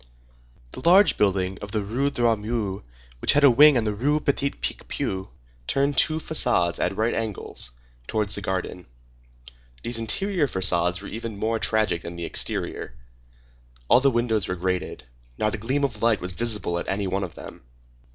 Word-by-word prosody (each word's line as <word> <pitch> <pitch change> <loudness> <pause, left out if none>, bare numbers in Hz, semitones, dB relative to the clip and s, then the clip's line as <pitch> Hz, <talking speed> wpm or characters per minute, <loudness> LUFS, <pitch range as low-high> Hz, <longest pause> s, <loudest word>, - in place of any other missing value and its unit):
The - - -8
large 190 +4 +6
building 95 -2 0
of 100 0 -8
the 105 -2 0
Rue 125 +8 -1
Droit 120 -5 +1
Mur, 105 -3 -3 0.4
which - - +4
had 145 - +3
a 140 - +8
wing 145 +3 +7
on 115 - +1
the 105 -1 -1
Rue 145 +8 +1
Petit 140 -1 0
Picpus, 95 -7 -3 0.4
turned 140 +1 +1
two 155 - +3
façades, 120 - +1
at 100 - -1
right 110 +2 +1
angles, 110 - -4 0.4
towards 105 -2 -1
this 100 - -3
garden. 90 -2 -4 1.0
These 120 -1 -2
interior 170 - +1
façades 90 -3 +1
were - - -7
even 115 -1 -6
more 110 +2 -1
tragic 110 -7 0
than 85 +1 -8
the 85 0 -5
exterior. - - -1 0.9
All - - +7
the 140 +1 +3
windows 120 -4 0
were 90 - -2
grated. 90 -4 -3 0.3
Not 110 0 0
a 115 - -3
gleam 130 +7 -1
of 115 -6 -2
light 115 -2 +3
was 90 +1 -4
visible 105 -4 -1
at - - -6
any 100 +1 -1
one 95 +1 -1
of - - -7
them. - - -11
110 Hz, 175 wpm, -24 LUFS, 95-125 Hz, 1.0 s, a